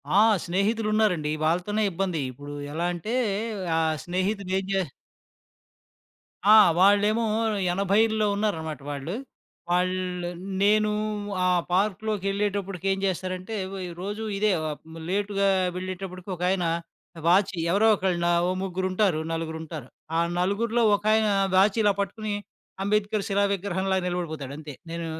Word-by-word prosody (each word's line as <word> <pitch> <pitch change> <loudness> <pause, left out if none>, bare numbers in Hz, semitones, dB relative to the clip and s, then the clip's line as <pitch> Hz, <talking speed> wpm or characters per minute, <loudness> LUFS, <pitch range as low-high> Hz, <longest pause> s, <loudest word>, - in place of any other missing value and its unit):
ఆ! - - +7 0.3
స్నేహితులున్నారండి. 210 -3 +1 0.2
వాళ్ళతోనే 180 +6 +1
ఇబ్బంది. 175 -3 -1
ఇప్పుడు 145 +3 -9 0.2
ఎలా 170 +2 -1
అంటే 195 +7 -4 0.6
ఆ - - +3 0.3
స్నేహితుడేం 190 +1 -1
చే 190 -4 +1 1.6
ఆ! 215 +1 +8 0.2
వాళ్ళేమో 205 +4 +4 0.5
80ల్లో 210 +3 +2
ఉన్నారన్నమాట 160 -9 -2
వాళ్ళు. 145 +7 -4 0.6
వాళ్ళు 180 0 0 0.3
నేను 210 +1 +4 0.6
ఆ - - +4 0.2
పార్క్‌లోకెళ్ళేటప్పటికి 200 -1 -1
ఏం 195 - 0
చేస్తారంటే, 185 +2 -3 0.2
వ - - -6 0.3
రోజు 205 +3 -4
ఇదే 210 0 +2 0.6
లేటుగా 200 0 +1 0.3
వెళ్ళేటప్పటికి 185 0 -6
ఒకాయన 180 0 0 0.6
వాచి 190 +1 +3
ఎవరో 210 +4 +4
ఒకళ్ళు, 175 -3 0 0.2
ఓ - - +1
ముగ్గురుంటారు. 185 -1 0
నలుగురుంటారు. 160 -4 -5 0.3
ఆ - - +3 0.2
నలుగురిలో 225 +5 +1
ఒకాయన 215 +1 +2 0.3
వాచ్ 195 +3 +4
ఇలా 205 -1 +4
పట్టుకుని 210 +1 -2 0.5
అంబేద్కర్ 210 0 0
శిలా 200 +1 +2
విగ్రహంలాగా 190 -1 -1
నిలబడిపోతాడంతే. 155 -4 -5 0.2
నేను 170 0 -4
190 Hz, 105 wpm, -26 LUFS, 175-205 Hz, 1.6 s, ఆ